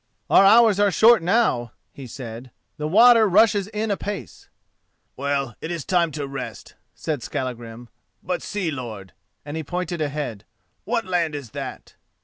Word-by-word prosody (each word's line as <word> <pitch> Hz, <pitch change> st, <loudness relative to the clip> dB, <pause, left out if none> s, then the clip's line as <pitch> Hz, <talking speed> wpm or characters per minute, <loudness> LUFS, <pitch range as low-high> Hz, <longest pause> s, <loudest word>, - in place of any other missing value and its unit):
"Our -, -, +7 dB
hours 215 Hz, 0 st, +6 dB
are 205 Hz, 0 st, +4 dB
short 225 Hz, +2 st, +5 dB
now," 165 Hz, -, +1 dB, 0.2 s
he 135 Hz, -2 st, -10 dB
said, 120 Hz, 0 st, -8 dB, 0.3 s
"the 150 Hz, -, -3 dB
water 225 Hz, +4 st, +6 dB
rushes 205 Hz, 0 st, +4 dB
in 215 Hz, 0 st, -3 dB
apace." 200 Hz, -, -6 dB, 0.7 s
"Well, 140 Hz, -2 st, -2 dB
it 160 Hz, -, -5 dB
is 170 Hz, -5 st, -4 dB
time 175 Hz, -2 st, +2 dB
to 145 Hz, -1 st, -4 dB
rest," 135 Hz, -1 st, -7 dB, 0.2 s
said 150 Hz, -5 st, -3 dB
Skallagrim; 120 Hz, -2 st, -6 dB, 0.4 s
"but 180 Hz, -, -2 dB
see, 190 Hz, -6 st, -3 dB
lord!" 110 Hz, -9 st, -7 dB, 0.3 s
and 145 Hz, +1 st, -6 dB
he 160 Hz, -, -3 dB
pointed 175 Hz, +1 st, -4 dB
ahead. 145 Hz, -8 st, -4 dB, 0.4 s
"What 230 Hz, +2 st, -1 dB
land 170 Hz, -4 st, -1 dB
is 135 Hz, -6 st, -8 dB
that?" -, -, -8 dB
160 Hz, 150 wpm, -23 LUFS, 130-205 Hz, 0.7 s, Our